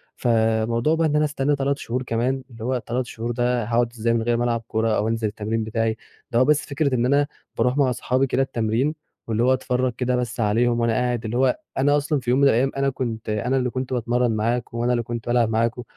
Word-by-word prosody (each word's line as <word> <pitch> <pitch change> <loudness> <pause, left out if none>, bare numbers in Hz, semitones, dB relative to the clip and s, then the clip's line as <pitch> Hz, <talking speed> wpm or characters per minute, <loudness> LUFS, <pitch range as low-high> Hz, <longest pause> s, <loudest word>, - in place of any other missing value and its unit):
فموضوع 115 +4 +1
بقى 165 0 +2
إن 150 - 0
أنا 150 0 +3
أستنى 145 -1 0
3 140 0 0
شهور 125 0 -3
كمان 125 +2 -1
اللي 115 -2 -10
هو 130 +2 0
3 125 +2 -2
شهور 115 0 -5
ده 120 0 0
هاقعُد 120 +1 +1
إزاي 115 0 0
من 115 - +1
غير 120 +1 +1
ما 120 - 0
العب 115 -1 0
كورة 110 -1 0
أو 105 - 0
أنزل 115 -1 0
التمرين 110 +2 -2
بتاعي 110 0 -1 0.3
ده 120 - +2
هو 130 - +5
بس 150 +1 +2
فكرة 140 -2 0
إن 120 0 +1
أنا 140 +2 +3 0.3
باروح 125 +2 +1
مع 140 -3 +3
اصحابي 130 +2 0
كده 130 +1 +1
التمرين 125 +3 0 0.3
واللي 115 0 0
هو 130 +1 +4
اتفرج 125 -1 0
كده 125 0 0
بس 125 -1 -3
عليهم 115 +2 +2
وأنا 115 -1 +2
قاعد 120 -1 -1
اللي 110 +2 -2
هو 135 - +2 0.2
أنا 145 +2 +3
أصلًا 145 0 0
في 120 -2 -5
يوم 125 +2 +3
من 140 - +5
الأيام 135 +2 +3
أنا 140 0 +2
كنت 115 -5 -4
أنا 110 +5 0
اللي 125 -1 0
كنت 130 +1 -4
باتمرن 120 0 +1
معاكم، 115 +2 -1
وأنا 120 +1 +1
اللي 120 -1 0
كنت 115 0 -6
بالعب 120 -2 +2
معاكم 115 +2 0
120 Hz, 235 wpm, -23 LUFS, 115-130 Hz, 0.3 s, هو